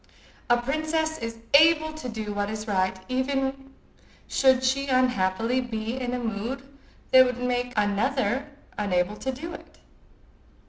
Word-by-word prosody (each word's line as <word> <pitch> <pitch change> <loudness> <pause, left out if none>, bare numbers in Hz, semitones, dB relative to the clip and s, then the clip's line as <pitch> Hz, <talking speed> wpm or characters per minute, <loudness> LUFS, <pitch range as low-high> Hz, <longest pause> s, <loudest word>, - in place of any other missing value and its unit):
A 240 - +5
princess 310 +4 -1
is 230 0 -5 0.2
able 315 +1 +6
to 310 -5 -6
do 220 -2 -4
what 205 0 -1
is 215 0 -5
right 190 -2 0
even 270 +1 -2 0.6
should 260 -1 +3
she 275 +2 +1
unhappily 250 -2 +1
be 225 -1 -4
in 250 -1 -2
a - - -1
mood 240 +4 -4 0.4
that 260 0 +9
would 250 -1 -2
make 245 0 -1
another 240 +5 +1 0.3
unable 185 -1 0
to 265 - -3
do 320 +7 -7
it. - - -12
250 Hz, 140 wpm, -26 LUFS, 220-270 Hz, 0.6 s, that